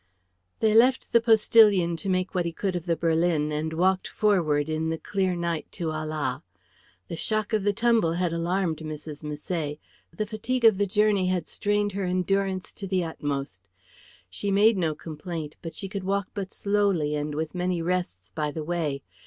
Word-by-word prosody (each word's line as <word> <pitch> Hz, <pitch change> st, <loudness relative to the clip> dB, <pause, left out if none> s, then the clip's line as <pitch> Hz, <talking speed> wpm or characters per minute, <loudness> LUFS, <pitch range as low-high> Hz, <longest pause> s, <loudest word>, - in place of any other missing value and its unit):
They 220 Hz, -1 st, +4 dB
left 250 Hz, +4 st, +4 dB
the 235 Hz, -, +6 dB
postillion 210 Hz, -6 st, +5 dB
to 195 Hz, -, -4 dB
make 185 Hz, 0 st, 0 dB
what 180 Hz, -2 st, 0 dB
he 170 Hz, -, -1 dB
could 185 Hz, +2 st, -2 dB
of 175 Hz, 0 st, -4 dB
the 170 Hz, -, +2 dB
berlin 165 Hz, -1 st, +1 dB
and 155 Hz, +1 st, -2 dB
walked 185 Hz, +3 st, +1 dB
forward 165 Hz, -9 st, +1 dB
in 160 Hz, 0 st, -1 dB
the 165 Hz, -, -1 dB
clear 190 Hz, 0 st, -1 dB
night 170 Hz, -2 st, -3 dB
to 165 Hz, -2 st, -2 dB
Ala. 155 Hz, -4 st, -3 dB, 0.7 s
The -, -, -5 dB
shock 215 Hz, +5 st, -1 dB
of 215 Hz, -2 st, +2 dB
the 205 Hz, -, +3 dB
tumble 225 Hz, -5 st, +2 dB
had 175 Hz, -1 st, 0 dB
alarmed 170 Hz, 0 st, 0 dB
Mrs. 155 Hz, -1 st, -7 dB
Misset; 150 Hz, 0 st, -3 dB, 0.3 s
the 190 Hz, +6 st, -3 dB
fatigue 230 Hz, +3 st, -2 dB
of 215 Hz, -4 st, +6 dB
the 205 Hz, -, +2 dB
journey 205 Hz, -1 st, +2 dB
had 180 Hz, -3 st, 0 dB
strained 205 Hz, +2 st, 0 dB
her 195 Hz, 0 st, -2 dB
endurance 185 Hz, +1 st, 0 dB
to 195 Hz, -, -6 dB
the 185 Hz, -1 st, +1 dB
utmost. 140 Hz, -, -4 dB, 0.6 s
She 90 Hz, -, -3 dB
made 210 Hz, +3 st, +5 dB
no 165 Hz, -5 st, 0 dB
complaint, 155 Hz, 0 st, -6 dB
but 165 Hz, -, -7 dB
she 195 Hz, -, -4 dB
could 195 Hz, -1 st, -5 dB
walk 200 Hz, 0 st, -1 dB
but 195 Hz, -2 st, -4 dB
slowly 200 Hz, -7 st, +1 dB
and 150 Hz, 0 st, -3 dB
with 160 Hz, +1 st, -3 dB
many 180 Hz, -1 st, -1 dB
rests 170 Hz, -, -2 dB
by 150 Hz, +6 st, -2 dB
the 155 Hz, +1 st, -5 dB
way. 150 Hz, -4 st, -2 dB
180 Hz, 185 wpm, -26 LUFS, 155-200 Hz, 0.7 s, the